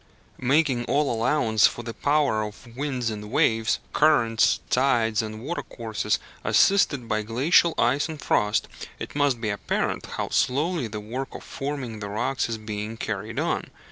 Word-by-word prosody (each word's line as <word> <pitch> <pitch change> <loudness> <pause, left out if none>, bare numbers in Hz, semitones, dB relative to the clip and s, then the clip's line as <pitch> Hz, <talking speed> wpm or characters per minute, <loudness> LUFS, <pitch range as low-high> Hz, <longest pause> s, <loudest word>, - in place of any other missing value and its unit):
Making 130 -1 +2
all 145 0 +1
allowance 115 -2 +3
for 120 - -6
the 115 0 -5
power 145 -6 +1
of 110 +3 -8
winds 130 -4 -2
and 105 -1 -7
waves, 115 -5 +2 0.2
currents, 115 -8 +3
tides, 120 -4 +2
and 110 0 -6
watercourses, 115 -8 -2 0.3
assisted 145 -11 +3
by 110 0 0
glacial 140 +9 +3
ice 135 +7 +2
and 155 -2 -6
frost, 105 -5 +1 0.3
it - - -7
must 145 -4 +1
be 110 -2 -2
apparent 100 - -2
how - - -4
slowly 150 +1 +1
the 105 0 -6
work 125 +6 -5
of - - -8
forming 135 -6 -5
the 100 -1 -5
rocks 120 +5 -1
is 115 - -2
being 110 +1 -5
carried 110 +1 -4
on. - - -1
120 Hz, 155 wpm, -25 LUFS, 110-140 Hz, 0.3 s, allowance